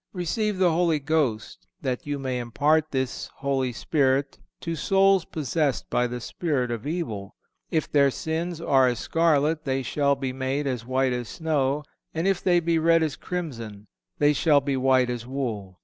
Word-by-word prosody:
Receive 200 +3 -1
the 185 -2 +4
Holy 165 -1 +2
Ghost, 140 -7 -1 0.2
that 130 +1 -3
you 145 -1 -1
may 130 -2 -2
impart 145 +7 +1
this 130 -3 -3
Holy 135 -2 -1
Spirit 135 +1 0 0.2
to 165 -1 -3
souls 195 +3 +3
possessed 150 -2 -1
by 125 0 +2
the 125 0 -5
spirit 130 -2 -2
of 115 +3 -4
evil. 115 - -4 0.3
"If 160 -2 -1
their 140 -2 +5
sins 165 +4 -3
are 135 -5 +4
as 120 -1 0
scarlet, 155 +1 +1
they 135 -2 -1
shall 140 +2 +1
be 135 -1 -3
made 135 +2 -2
as 125 -4 -3
white 130 0 +1
as 120 -2 -4
snow; 150 -3 0 0.3
and 165 +4 0
if 195 -2 +1
they 175 -2 +3
be 165 -1 +1
red 165 0 +4
as 155 -3 -1
crimson, 115 - -6 0.3
they 145 0 +4
shall 150 0 +4
be 140 0 -2
white 130 -1 +3
as 120 -1 -5
wool." 110 -9 -4
140 Hz, 175 wpm, -25 LUFS, 130-160 Hz, 0.3 s, their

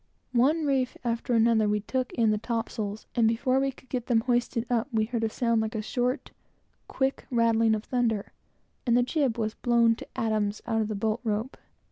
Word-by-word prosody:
One 295 +6 +3
reef 265 -3 0
after 235 +1 -1
another, 225 -2 +4
we 210 0 +1
took 255 +4 -2
in 225 -2 +3
the 210 - 0
topsails, 225 -2 -3
and 230 -2 +3
before 255 +4 +2
we 270 0 +1
could 260 - -20
get 250 -2 -3
them 230 -3 +3
hoisted 240 -1 0
up, 235 -1 0
we 220 -2 +1
heard 230 0 -3
a 225 - +1
sound 230 0 +1
like 220 +1 -3
a 215 - -1
short, 250 +4 -2 0.6
quick 265 0 -1
rattling 230 -2 +3
of 215 - -4
thunder, 230 -5 -1 0.5
and 235 0 +4
the 245 - +4
jib 255 -2 0
was 220 -1 -1
blown 235 -1 +3
to - - -9
atoms 215 -2 0
out 225 0 0
of 215 - -1
the 215 - -3
bolt 220 +3 -1
rope. 220 +3 -2
230 Hz, 200 wpm, -27 LUFS, 220-250 Hz, 0.6 s, another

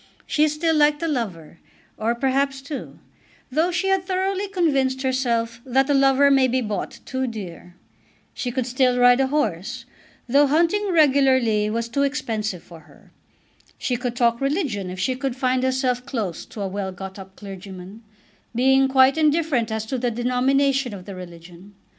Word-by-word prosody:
She 305 0 +2
still 320 +2 0
liked 295 +1 +3
a - - 0
lover, 190 - -4 0.4
or 225 +2 -1
perhaps 270 +2 0
two, 280 0 -7 0.5
though 315 +6 +2
she 370 +2 -1
had 385 -1 +2
thoroughly 380 +1 -1
convinced 275 -9 0
herself 235 -3 -1
that 270 +2 +1
a - - +4
lover 275 +1 +4
may 270 -1 +4
be 255 +1 0
bought 215 -4 -4
too 260 0 -2
dear. 180 -6 -8 0.6
She 245 - -3
could 255 0 -2
still 255 0 +1
ride 245 0 +5
a 270 - +2
horse, 235 - -2 0.4
though 280 +4 +4
hunting 340 +8 +2
regularly 260 -9 +3
was 230 +1 -2
too 245 +4 -1
expensive 220 - -2
for 170 -2 -13
her. 155 - -21 0.7
She 250 - -1
could 245 0 -3
talk 235 0 +1
religion 275 - -1
if 180 0 -7
she 255 +7 0
could 265 -1 -3
find 255 -1 0
herself 255 -1 0
close 225 - -4
to 210 - -8
a 195 - -1
well 190 0 -4
got 190 +1 -9
up 190 0 -12
clergyman, 195 0 -10 0.5
being 265 +2 +4
quite 265 +2 +4
indifferent 300 -7 +1
as 220 0 -2
to 255 +3 -3
the 245 0 0
denomination 255 +1 +1
of 185 -2 -11
the 200 - -8
religion. 180 +2 -12
255 Hz, 170 wpm, -22 LUFS, 215-275 Hz, 0.7 s, ride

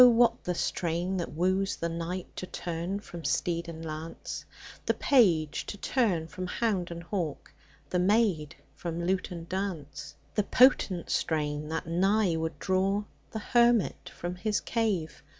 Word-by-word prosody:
what 235 0 +3
the 180 - 0
strain 175 +3 -1
that 175 - -3
woos 185 +4 +1
the 170 - -2
knight 170 +2 -3
To 185 - -4
turn 175 +4 -3
from 170 -5 -9
steed 170 +4 0
and 165 0 -7
lance, 155 +1 -6 0.4
The - - +3
page 170 - +3
to 205 - -5
turn 200 -8 +1
from 185 +2 -5
hound 195 -3 0
and 170 0 -6
hawk, 170 -5 -3 0.4
The 180 - +2
maid 185 -6 +2 0.2
from 170 0 -3
lute 185 +1 0
and 170 -2 -7
dance; 185 -6 -4 0.2
The 210 - +3
potent 205 -7 +4
strain, 150 -1 0
that 160 0 -2
nigh 190 +2 +2
would 160 0 -2
draw 195 +2 +1 0.3
The - - -5
hermit 235 0 +3
from 175 +1 -5
his 210 +3 0
cave. 200 - -1
180 Hz, 150 wpm, -29 LUFS, 165-200 Hz, 0.4 s, potent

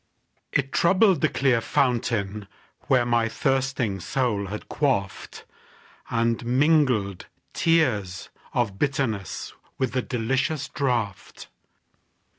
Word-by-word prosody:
It 135 -1 0
troubled 185 -1 +4
the - - +3
clear 130 -4 +2
fountain 110 -6 0 0.4
where 125 -2 +3
My 120 -1 +2
thirsting 130 -6 0
soul 105 -2 -1
had 105 +2 -7
quaffed, 115 -10 -2 0.6
And 115 0 0
mingled 125 - +2 0.3
tears 115 - +1 0.2
of 100 -5 -1
bitterness 135 -9 -2 0.2
With 130 -3 -1
the 130 +1 0
delicious 130 +6 -1
draught. 120 -8 -3
120 Hz, 95 wpm, -25 LUFS, 105-135 Hz, 0.6 s, troubled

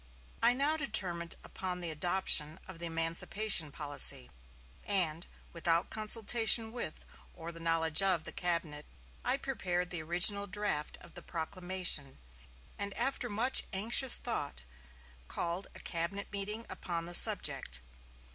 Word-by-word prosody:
I 235 +1 +4
now 290 +4 0
determined 175 - 0
upon 180 -1 -6
the 170 -2 -5
adoption 160 -1 +1
of 185 -3 -11
the 170 - -2
emancipation 165 +1 +1
policy; 145 - +1 0.5
and, 175 -4 -1 0.3
without 170 0 0
consultation 220 +1 +2
with, 235 -10 -6 0.3
or 165 +1 -9
the 165 - -12
knowledge 165 0 +1
of, 185 -5 +1
the - - -5
cabinet, 170 -4 -3 0.4
I 255 +2 0
prepared 180 -10 -4
the 175 -3 -3
original 180 +5 +4
draft 195 -7 -3
of 170 - -16
the 175 - -10
proclamation, 175 -4 -2 0.6
and 200 -1 -4
after 270 -2 -2
much 230 +5 +3
anxious 230 +6 +7
thought 145 - -4 0.6
called 170 - -4
a - - -9
cabinet 175 +4 -4
meeting 210 +3 -4
upon 170 -3 -6
the 175 - -5
subject.... 60 - +4
180 Hz, 130 wpm, -31 LUFS, 165-205 Hz, 0.6 s, anxious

